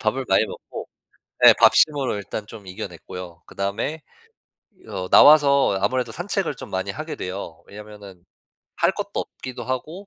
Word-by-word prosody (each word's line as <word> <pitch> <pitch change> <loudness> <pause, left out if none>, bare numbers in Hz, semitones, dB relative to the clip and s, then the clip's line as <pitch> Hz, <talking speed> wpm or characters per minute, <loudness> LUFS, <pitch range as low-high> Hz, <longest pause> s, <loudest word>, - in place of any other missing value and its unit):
밥을 130 +5 -1
많이 95 +3 +4
먹고 - - -9 0.6
네 - - +10
밥심으로 145 -6 +4
일단 105 +1 -6
좀 105 -3 -12
이겨냈고요. 90 -1 -9
그다음에 110 +11 -3 0.9
어 95 -3 -5
나와서 140 -8 +6
아무래도 120 +3 -1
산책을 185 - -2
좀 - - -10
많이 95 +1 -3
하게 155 +8 -6
돼요. 90 -3 -7
왜냐면은 100 -3 -12 0.5
할 - - +2
것도 - - -5
없기도 130 -1 -8
하고 155 +10 -5
110 Hz, 315 characters per minute, -22 LUFS, 95-140 Hz, 0.9 s, 네